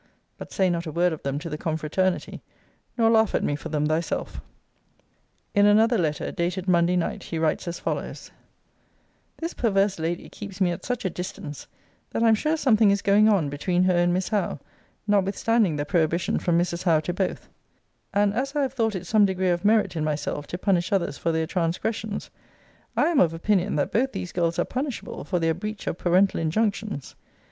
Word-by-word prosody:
But - - -9
say 190 - +2
not 170 0 -2
a - - -4
word 175 +2 +2
of 155 - -7
them 140 0 -2
to 150 - -5
the 150 -2 -5
confraternity: 160 +4 -1 0.6
nor 225 -1 +4
laugh 220 -2 +3
at - - +1
me 145 - 0
for 145 - -7
them 150 -1 0
thyself. 155 +2 -2 1.1
In 205 0 +5
another 220 +2 +4
letter, 155 -4 -1
dated 180 +2 -2
Monday 175 0 +3
night, 175 - -1
he 165 - -5
writes 160 +2 0
as 170 - -3
follows: - - -4 1.1
This 330 +1 -4
perverse 195 -5 +1
lady 165 +2 -3
keeps 200 -2 -9
me 185 -2 +3
at 170 - -6
such 245 -4 -3
a - - +2
distance, 160 -5 -7 0.4
that 225 - -1
I 230 - +5
am - - +6
sure 305 +9 +1
something 225 -8 +4
is 200 0 +1
going 210 +2 +5
on 190 -8 +3
between 175 +5 0
her 185 -1 +3
and 175 0 +3
Miss 185 +1 -1
Howe, 200 -8 -1 0.5
notwithstanding 205 -1 +2
the 145 0 -2
prohibition 170 +1 +1
from 170 -1 +1
Mrs. 175 0 0
Howe 165 -4 +3
to 175 +3 -3
both: 185 +1 -2 0.6
and 205 0 +2
as 270 +6 -2
I 290 - +2
have 265 -2 -2
thought 225 -5 0
it 185 - -5
some 215 -2 +4
degree 190 -1 0
of 175 0 0
merit 215 -2 +3
in 160 - -1
myself 150 -1 -2
to 175 - -4
punish 185 0 +1
others 190 -7 0
for 165 - 0
their 160 0 0
transgressions, 195 +5 -2 0.7
I - - +4
am 335 - +2
of 165 -2 +3
opinion 195 +2 +1
that 145 - 0
both 265 +4 +1
these 180 - -5
girls 170 -1 0
are - - +1
punishable 260 -1 -4
for 180 - -1
their 165 -1 +1
breach 210 +5 -6
of 170 - -3
parental 185 +3 +3
injunctions. 200 - -1
185 Hz, 200 wpm, -25 LUFS, 165-210 Hz, 1.1 s, am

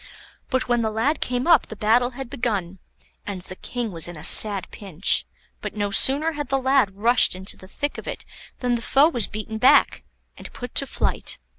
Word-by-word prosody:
But 260 -2 -1
when 240 -1 +1
the 220 - -1
lad 245 +8 -1
came 250 0 -2
up 335 -5 +4
the 220 - -9
battle 225 +4 +2
had 270 -2 -6
begun, 195 -7 -3 0.5
and 200 -2 -5
the 185 +1 -8
King 240 +2 -5
was 165 -2 -2
in 175 -2 -9
a 150 - -10
sad 200 +2 +5
pinch; 190 -3 -2 0.3
but - - -6
no 205 -1 -2
sooner 280 +10 +2
had 290 -3 -6
the 270 - +1
lad 260 -7 +1
rushed 230 -1 +4
into 190 +2 -5
the 185 - -15
thick 290 +9 -4
of - - -11
it - - -7 0.4
than 250 -1 0
the 235 - -1
foe 275 +6 +3
was 240 - -1
beaten 215 +1 -6
back, 255 - +4 0.4
and - - -9
put 245 - -8
to 275 - +3
flight. - - -2
230 Hz, 205 wpm, -22 LUFS, 200-260 Hz, 0.5 s, sad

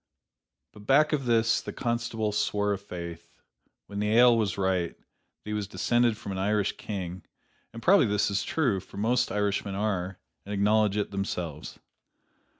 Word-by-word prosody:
But 105 0 -14
back 150 +3 +4
of 140 -3 0
this 115 -1 +3
the - - -6
constable 115 -2 -2
swore 105 0 0
i' - - -2
faith, 85 -3 -9 0.5
when 100 +1 -6
the 105 +1 +1
ale 120 0 +7
was 110 -3 0
right, 95 -3 0
that - - -35 0.4
he 105 - -4
was 105 -2 -2
descended 120 +1 +1
from 100 - -7
an 95 - -3
Irish 100 +1 +1
King, 95 -3 -5 0.5
and 115 -1 -10
probably 185 - +5
this 105 0 +1
is 100 +1 0
true, 120 -5 0
for 95 - -13
most 120 +4 +1
Irishmen 100 -1 -1
are, 95 -3 -2 0.3
and 100 +1 -5
acknowledge 105 0 +3
it 105 - -1
themselves. 90 -6 -4
105 Hz, 165 wpm, -28 LUFS, 95-115 Hz, 0.5 s, ale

